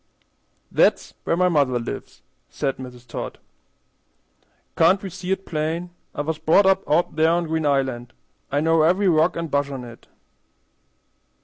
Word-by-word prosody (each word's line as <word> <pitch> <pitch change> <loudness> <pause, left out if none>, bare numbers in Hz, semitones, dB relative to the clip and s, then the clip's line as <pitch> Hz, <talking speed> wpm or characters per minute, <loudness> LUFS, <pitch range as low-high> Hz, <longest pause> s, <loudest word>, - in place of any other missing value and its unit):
"That's - - +2
where 165 - +1
mother 150 -8 +2
lives," 115 - -7 0.3
said 135 - -2
Mrs. 125 -1 -10
Todd. 115 - -6 1.4
"Can't 170 +4 +4
we 195 - -5
see 185 +1 -5
it 190 0 -1
plain? 165 +3 -3 0.2
I - - -1
was 155 +1 -3
brought 160 +5 +4
up 195 0 +4
out 155 +1 +2
there 160 +1 +4
on 170 +1 +1
Green 160 -1 -1
Island. 130 -3 -1 0.4
I 145 +1 +1
know 165 0 +3
every 185 +5 +3
rock 165 0 +3
an' 170 - -2
bush 140 0 0
on 135 -3 -6
it." 120 -1 -12
160 Hz, 150 wpm, -23 LUFS, 140-175 Hz, 1.4 s, Can't